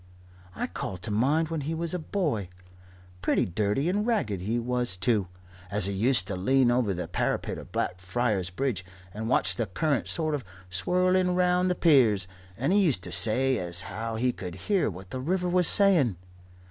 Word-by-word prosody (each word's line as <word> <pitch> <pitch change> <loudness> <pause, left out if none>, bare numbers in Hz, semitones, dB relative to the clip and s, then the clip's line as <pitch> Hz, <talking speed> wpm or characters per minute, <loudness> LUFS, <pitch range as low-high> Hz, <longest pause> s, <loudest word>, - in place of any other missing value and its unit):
I - - -2
call 95 - -5
to 90 +4 -6
mind 145 +9 +1
when 165 -2 -3
he 155 +4 -3
was 165 +1 -2
a 180 - -2
boy 155 - -2 0.7
pretty - - +1
dirty 105 - -1
and 200 +4 +1
ragged 170 - -1
he 110 +6 -1
was 120 -4 0
too 100 0 +1 0.4
as 100 -1 +1
he 100 - -2
used 105 -1 +2
to 100 - -3
lean 125 +7 +3
over 120 -4 +1
the 90 -1 -4
parapet - - -2
of - - -12
Blackfriars 95 +1 -1
Bridge 100 0 -2 0.3
and 110 +2 -4
watch - - +1
the 115 -3 -1
current 140 - -1
sort 155 -2 -1
of 145 -3 -2 0.3
swirling 180 - +1
round 180 0 +2
the 180 - +1
piers, 120 - +4 0.3
and 135 +9 0
he 205 - +4
used 130 - +1
to 90 - -3
say 115 +9 +4
as 85 -1 -1
how 110 +4 -5
he 125 +3 +1
could 90 -7 -8
hear 200 - +2
what 95 0 -10
the 130 - -4
river 180 +5 -1
was 180 -1 +3
saying. 175 - +4
120 Hz, 185 wpm, -27 LUFS, 95-165 Hz, 0.7 s, piers